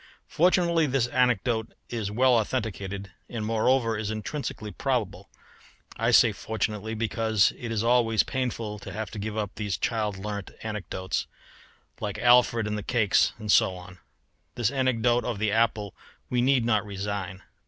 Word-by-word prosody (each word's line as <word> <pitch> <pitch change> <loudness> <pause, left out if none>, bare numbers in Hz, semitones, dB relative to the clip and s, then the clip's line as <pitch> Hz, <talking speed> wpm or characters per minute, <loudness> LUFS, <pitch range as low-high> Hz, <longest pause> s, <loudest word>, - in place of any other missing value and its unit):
Fortunately 170 -2 +3
this 135 -3 +1
anecdote 120 -2 +1
is 110 -4 -3
well 125 +3 +4
authenticated, 100 -4 -3 0.2
and 110 -3 -4
moreover 115 +1 +2
is 105 -1 -3
intrinsically 110 0 -4
probable; 105 -9 -2 0.7
I - - 0
say - - +6
fortunately, 110 0 -3
because 110 -2 +2
it 120 -2 -6
is 110 -1 0
always 115 -3 +3
painful 115 -5 -3
to - - -9
have 110 -1 -5
to 110 - -7
give 110 +1 -4
up 105 -2 -2
these 105 -3 -3
child 105 -3 -1
learnt 100 0 -5
anecdotes, 95 -4 -3 0.7
like 105 -1 -4
Alfred 120 -1 +4
and 105 0 -2
the - - -5
cakes 105 -1 +2
and 105 -2 -2
so 95 - +4
on. 90 0 -12 0.6
This 120 -1 +1
anecdote 125 -3 +2
of 120 -4 -3
the 105 0 0
apple 110 -2 +1 0.4
we 125 -1 +2
need 130 -2 +3
not 110 -4 +2
resign. 100 -2 -5
110 Hz, 155 wpm, -27 LUFS, 105-120 Hz, 0.7 s, say